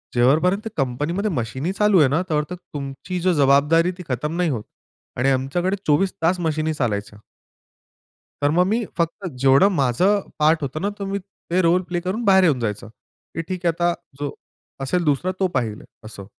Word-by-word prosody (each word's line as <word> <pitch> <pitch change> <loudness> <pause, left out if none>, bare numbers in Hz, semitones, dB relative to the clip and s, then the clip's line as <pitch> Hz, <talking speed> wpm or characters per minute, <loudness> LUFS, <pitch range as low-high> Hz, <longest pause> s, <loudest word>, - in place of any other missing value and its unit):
जेव्हापर्यंत 160 - +3
कंपनीमध्ये 150 - -1
मशीनी 130 - -2
चालू 210 -2 +4
आहे 145 - +6
ना, 155 +6 +1
तेव्हा 150 -1 +1
तर 180 - -4
तुमची 145 +2 -6
जबाबदारी 160 0 +3
ती - - -6
खतम 150 +6 -2
नाही 175 -2 +1
होत. 115 -6 -2 0.5
आणि 130 +3 +2
आमच्याकडे 145 +9 0
24 155 +6 +2
तास 175 +3 +2
मशीनी 155 -1 -1
चालायच्या. 105 -6 -3 1.2
तर 145 - +3
मग 180 +3 +3
मी 225 +3 +1
फक्त 170 +4 -2
जेवढं 135 +9 +5
माझं 160 - +2 0.2
पार्ट 155 +1 +3
होतं 140 +2 -3
ना, 200 - 0
तर 205 -1 -6
मी 195 +1 -2
ते 185 -1 -3
रोल 175 +2 +3
प्ले 175 - 0
करून 190 +7 -3
बाहेर 190 -1 +6
येऊन 150 -8 +3
जायचं. 105 -1 -3 0.5
की 165 - -1
ठीक 180 +1 -6
आहे 170 - +3
आता 175 +1 +1 0.3
जो 145 -1 -3 0.5
असेल 175 +6 0
दुसरा, 150 +5 +1
तो 190 - +3
पाहिल 115 -9 -2 0.2
असं. 105 -3 -9
160 Hz, 175 wpm, -22 LUFS, 135-185 Hz, 1.2 s, आहे